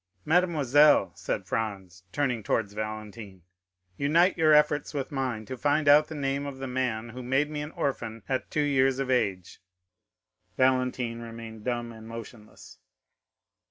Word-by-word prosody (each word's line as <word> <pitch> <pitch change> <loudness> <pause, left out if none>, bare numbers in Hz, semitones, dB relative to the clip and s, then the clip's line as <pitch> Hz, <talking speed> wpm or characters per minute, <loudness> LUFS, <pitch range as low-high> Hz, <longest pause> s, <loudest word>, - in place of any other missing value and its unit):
"Mademoiselle," 150 -4 +4
said - - -4
Franz, 95 -5 -4
turning 125 -2 -1
towards 100 0 -1
Valentine, 110 -3 -7 0.5
"unite 165 +6 +3
your 160 -2 +3
efforts 150 0 +3
with 135 0 -3
mine 130 -6 -3
to 130 - -6
find 145 +3 +1
out 150 +1 +7
the 160 - -7
name 140 0 -2
of 140 -1 -7
the 135 - -5
man 125 -3 -2
who 125 +2 -8
made 135 +4 0
me 150 -1 -3
an 150 - -5
orphan 115 -5 -3
at 130 -1 -2
two 150 - 0
years 135 -2 +2
of 135 -1 -2
age." 95 -8 -1 1.0
Valentine 125 -2 +1
remained 115 -2 -9
dumb 120 -1 -2
and 110 -1 -12
motionless. 110 - -11
130 Hz, 150 wpm, -27 LUFS, 110-145 Hz, 1.0 s, out